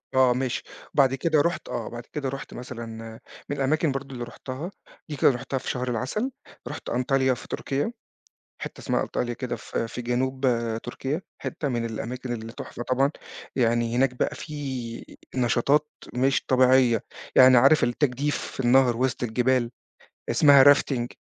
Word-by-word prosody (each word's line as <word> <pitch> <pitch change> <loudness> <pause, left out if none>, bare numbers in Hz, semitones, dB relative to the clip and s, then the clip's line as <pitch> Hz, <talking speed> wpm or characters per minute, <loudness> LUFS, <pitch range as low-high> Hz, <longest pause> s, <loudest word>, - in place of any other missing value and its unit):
آه، 130 -2 +5
ماشي. 130 -1 -2 0.3
بعد 135 -2 +4
كده 155 +2 +2
رُحت، 170 +3 -1
آه، - - -3
بعد 120 0 -8
كده 140 -3 -2
رُحت 135 +1 -7
مثلًا 120 -2 -7 0.6
من 145 - -2
الأماكن 150 +3 +1
برضه 135 0 -5
اللي 120 -1 -5
رُحتها، 130 +8 -7 0.4
دي 150 - -3
كانت 135 -1 +4
رُحتها 135 +2 -3
في 130 - -5
شهر 125 0 -2
العسل. 130 - -2 0.4
رُحت - - -6
أنطاليا 130 +1 +2
في 120 - -9
تركيا، 140 +10 -2 0.7
حتة - - -7
اسمها - - 0
أنطاليا 120 -1 -2
كده، 120 -1 -4
في 115 0 -4
في 125 - -6
جنوب، 130 +2 -1
آآ، 115 -2 +1
تركيا. 135 +8 -4 0.2
حتة 145 - -3
من 120 -2 -1
الأماكن 120 +3 -4
اللي 115 -1 -6
تحفة 120 - -7
طبعًا. 135 +3 +2 0.5
يعني 120 -1 +2
هناك 130 -1 +2
بقى - - -1
في 130 -6 -6 0.2
نشاطات 130 +5 +2 0.3
مش 130 -1 +2
طبيعية. 130 -3 +4 0.3
يعني 130 0 +8
عارف 135 +5 +6
التجديف 135 +3 0
في - - -6
النهر 125 -1 +4
وسط 130 0 -1
الجبال، 125 +1 +1 0.6
اسمها 140 -3 +7
Rafting. 135 -4 +4
130 Hz, 160 wpm, -25 LUFS, 120-135 Hz, 0.7 s, يعني